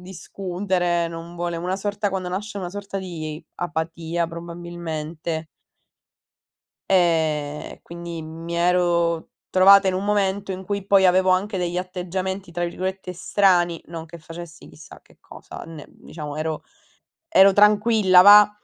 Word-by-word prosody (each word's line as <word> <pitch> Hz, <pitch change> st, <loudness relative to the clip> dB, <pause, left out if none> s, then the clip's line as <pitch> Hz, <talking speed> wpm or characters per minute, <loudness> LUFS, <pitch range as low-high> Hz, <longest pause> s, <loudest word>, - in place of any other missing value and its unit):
discutere, 180 Hz, -1 st, -2 dB
non 165 Hz, +1 st, -9 dB
vuole 175 Hz, 0 st, -3 dB
una 180 Hz, +3 st, -2 dB
sorta 205 Hz, +1 st, -2 dB
quando 185 Hz, -2 st, -3 dB
nasce 205 Hz, +3 st, -5 dB
una 180 Hz, -2 st, -5 dB
sorta 200 Hz, 0 st, -6 dB
di 160 Hz, -4 st, -6 dB
apatia, 165 Hz, 0 st, -3 dB
probabilmente 170 Hz, -1 st, -6 dB, 1.4 s
e 155 Hz, -5 st, +1 dB
quindi 170 Hz, -1 st, -7 dB
mi 165 Hz, +2 st, -7 dB
ero 170 Hz, -1 st, +1 dB, 0.2 s
trovata 195 Hz, +1 st, +6 dB
in 185 Hz, -, +2 dB
un 190 Hz, +2 st, -2 dB
momento 200 Hz, -1 st, 0 dB
in 190 Hz, 0 st, -5 dB
cui 200 Hz, 0 st, -3 dB
poi 195 Hz, -1 st, +5 dB
avevo 185 Hz, +1 st, +4 dB
anche 190 Hz, +3 st, +1 dB
degli 175 Hz, -1 st, -2 dB
atteggiamenti, 185 Hz, +1 st, -4 dB
tra 175 Hz, +1 st, -2 dB
virgolette, 185 Hz, +1 st, -4 dB
"strani", 175 Hz, -2 st, +2 dB
non 165 Hz, -1 st, -8 dB
che 170 Hz, +1 st, -11 dB
facessi 165 Hz, +1 st, -11 dB
chissà 155 Hz, -, -14 dB
che -, -, -25 dB
cosa, -, -, -11 dB
ne 160 Hz, -3 st, -10 dB
diciamo 150 Hz, -2 st, -9 dB
ero 155 Hz, 0 st, -3 dB, 0.6 s
ero 195 Hz, -8 st, +6 dB
tranquilla, 210 Hz, -2 st, +5 dB
va. 205 Hz, +1 st, +9 dB
175 Hz, 135 wpm, -23 LUFS, 165-190 Hz, 1.4 s, va